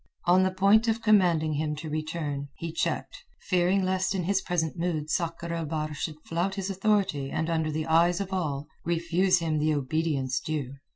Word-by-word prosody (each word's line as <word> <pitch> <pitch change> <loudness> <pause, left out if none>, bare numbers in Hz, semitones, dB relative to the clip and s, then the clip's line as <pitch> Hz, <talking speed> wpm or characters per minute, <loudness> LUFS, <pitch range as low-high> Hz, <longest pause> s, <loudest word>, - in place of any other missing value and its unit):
On 180 +1 +5
the 190 - +3
point 200 +4 +4
of 225 0 0
commanding 175 -7 +4
him 150 +1 -1
to 155 +2 -7
return, 155 -2 -3
he 165 -1 -5
checked, 165 - -3 0.2
fearing 185 0 +2
lest 190 +1 0
in 185 - -1
his 195 +2 +1
present 170 -4 -1
mood 165 -3 -2
Sakr 170 0 -2
el 165 -1 -2
Bahr 155 0 -3
should 155 +1 -5
flout 175 +4 -1
his 195 0 -3
authority 195 -8 +1
and 160 +3 -2
under 160 -1 0
the 155 +1 -2
eyes 170 +2 +3
of 195 -1 -4
all 150 -6 -2 0.2
refuse 170 +2 +2
him 160 -3 0
the 155 0 +2
obedience 140 -2 -1
due. 145 -2 -3
165 Hz, 185 wpm, -27 LUFS, 155-185 Hz, 0.2 s, On